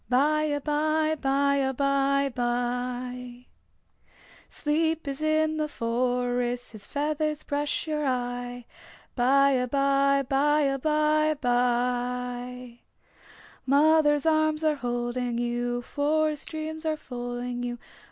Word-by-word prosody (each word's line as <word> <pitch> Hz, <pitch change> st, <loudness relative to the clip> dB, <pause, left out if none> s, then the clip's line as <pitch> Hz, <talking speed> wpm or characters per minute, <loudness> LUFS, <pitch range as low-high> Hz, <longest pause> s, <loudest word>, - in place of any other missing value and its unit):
By 300 Hz, +4 st, +3 dB
abye, 310 Hz, +2 st, 0 dB
by 280 Hz, +1 st, +2 dB
abye 275 Hz, 0 st, +1 dB
bye. 245 Hz, 0 st, -3 dB, 1.0 s
Sleep 320 Hz, +1 st, -1 dB
is 275 Hz, +1 st, -4 dB
in 310 Hz, 0 st, +1 dB
the 305 Hz, -1 st, 0 dB
forest 245 Hz, 0 st, -1 dB
His 215 Hz, -3 st, -10 dB
feathers 305 Hz, +1 st, -1 dB
brush 290 Hz, +1 st, -2 dB
your 300 Hz, -2 st, -1 dB
eye. 245 Hz, -1 st, -3 dB, 0.5 s
By 275 Hz, +3 st, +4 dB
abye, 275 Hz, +1 st, +2 dB
by 295 Hz, +2 st, +3 dB
abye 305 Hz, +1 st, +1 dB
bye. 245 Hz, 0 st, -1 dB, 0.9 s
Mother's 295 Hz, +1 st, +4 dB
arms 310 Hz, -1 st, +2 dB
are 310 Hz, -1 st, +3 dB
holding 240 Hz, -1 st, -2 dB
you, 240 Hz, 0 st, -2 dB
Forest 300 Hz, +2 st, 0 dB
dreams 315 Hz, 0 st, -5 dB
are 315 Hz, -1 st, -1 dB
folding 245 Hz, -2 st, -5 dB
you. 240 Hz, 0 st, -3 dB
275 Hz, 100 wpm, -27 LUFS, 245-305 Hz, 1.0 s, By